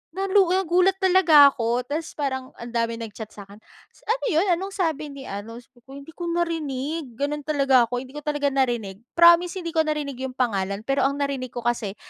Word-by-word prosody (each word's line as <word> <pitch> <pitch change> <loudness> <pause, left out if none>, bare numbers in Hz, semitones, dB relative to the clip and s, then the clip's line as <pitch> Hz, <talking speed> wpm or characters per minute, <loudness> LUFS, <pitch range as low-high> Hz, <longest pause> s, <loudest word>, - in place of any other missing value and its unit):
na 385 +3 -3
lu 390 0 +5
a 375 - +3
gulat 365 +3 +4
talaga 355 -6 +7
ako. 245 -1 -2
Tapos 310 +2 -4
parang 265 -3 -4
ang 235 - -7
daming 230 -1 -2
nag-chat 220 -1 -8
sa'kin, 200 -1 -12 0.4
s - - -24
"Ano 465 +3 -1
'yon, 330 -3 +2
anong 370 +3 -1
sabi 315 -5 -1
ni 280 -1 -10
ano?" 210 +1 -7
Sabi 240 0 -16
ko, 270 +3 -13
"Hindi 280 +3 -11
ko 345 +1 -6
narinig. 315 -5 -3
Gano'n 290 +3 -2
talaga 275 -5 +3
ako, 245 - -3
hindi 260 0 -13
ko 295 - -7
talaga 290 -1 -1
narinig, 240 -7 -1 0.2
promise 340 +2 +6
hindi 335 -1 -5
ko 320 - +2
narinig 295 -4 -3
'yong 260 -1 -5
pangalan 200 -4 -1
pero 275 +2 +1
ang 280 - -4
narinig 280 -3 -3
ko 240 0 -8
kasi. 225 -4 -2
280 Hz, 210 wpm, -24 LUFS, 240-325 Hz, 0.4 s, talaga